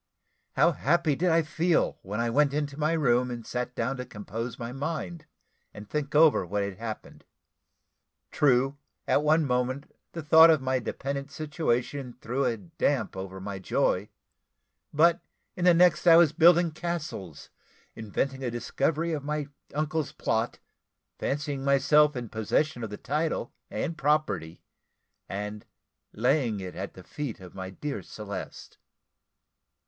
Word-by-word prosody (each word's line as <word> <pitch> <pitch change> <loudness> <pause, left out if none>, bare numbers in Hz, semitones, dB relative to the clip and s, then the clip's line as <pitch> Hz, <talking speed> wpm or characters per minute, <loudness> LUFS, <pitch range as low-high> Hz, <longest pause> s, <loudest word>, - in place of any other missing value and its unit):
How - - +4
happy 160 0 +1
did 180 +5 +1
I 165 0 +4
feel 165 +2 +1
when 105 +3 -5
I 115 0 0
went 140 +2 +3
into 145 -2 -2
my 155 +2 0
room, 125 -5 +2
and 120 -2 -6
sat 125 0 -4
down 125 +4 -1
to 125 - -4
compose 115 +2 -6
my 115 0 -5
mind, 155 +4 -4 0.5
and 105 0 -9
think 150 +3 -3
over 155 -6 +6
what 100 +3 -2
had 100 -2 -5
happened. 110 -2 -7 1.1
True, 135 0 +2 0.3
at - - +3
one 155 +1 +3
moment, 130 +2 -2 0.2
the 165 - -5
thought 160 +3 +8
of 160 -2 +5
my 130 0 0
dependent 140 +3 -4
situation 140 -4 -2
threw 125 +4 -1
a 115 - 0
damp 95 -1 -1
over 95 0 -6
my 100 0 -5
joy; 95 - 0 0.8
but 165 +3 +4 0.4
in 180 - -1
the 180 - +7
next 180 +1 +4
I 165 - +9
was 165 -4 +5
building 170 +1 +5
castles, 155 - -5 0.4
inventing 130 +5 -3
a 125 - -1
discovery 150 +7 -1
of 145 -3 -3
my 150 0 -3 0.2
uncle's 155 0 -2
plot, 115 -5 -1 0.6
fancying 140 -1 -2
myself 140 +2 +4
in 120 -1 -4
possession 120 +5 0
of 110 - -4
the 105 - -7
title 155 +4 -2 0.2
and 165 - -3
property, 135 - 0 0.7
and 105 +1 -5 0.5
laying 120 -1 +1
it 95 -1 -6
at 100 +1 -6
the 95 - -11
feet 140 +2 -5
of 90 -2 -12
my 95 -1 -6
dear 140 +9 -5
Celeste. 100 -3 -8
140 Hz, 150 wpm, -28 LUFS, 115-155 Hz, 1.1 s, I